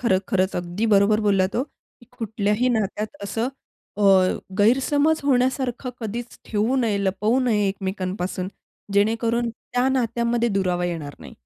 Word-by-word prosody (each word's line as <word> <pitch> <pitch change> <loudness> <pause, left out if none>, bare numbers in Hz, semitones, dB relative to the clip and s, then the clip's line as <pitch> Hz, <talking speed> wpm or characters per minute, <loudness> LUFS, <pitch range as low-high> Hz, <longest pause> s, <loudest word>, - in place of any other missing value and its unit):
खर 190 -7 +3
खरंच 190 -3 +1
अगदी 175 +5 -2
बरोबर 205 +2 +4
बोललात 195 0 +2
हो, 250 - +2 0.4
की 240 - -18
कुठल्याही 215 +2 0
नात्यात 215 +6 -4
असं 225 +5 -2 0.5
अ, - - 0 0.6
गैरसमज 285 +8 +3
होण्यासारखं 255 -1 +1
कधीच 235 +2 -5
ठेवू 220 +4 0
नये, 225 -5 +1
लपवू 210 +6 +1
नये 210 -5 +2
एकमेकांपासून, 190 -1 -3 0.4
जेणेकरून 230 +3 +1
त्या 245 +2 -2
नात्यांमध्ये 235 -2 +1
दुरावा 180 -2 0
येणार 160 -5 -4
नाही. - - -11
220 Hz, 130 wpm, -23 LUFS, 195-240 Hz, 0.6 s, बरोबर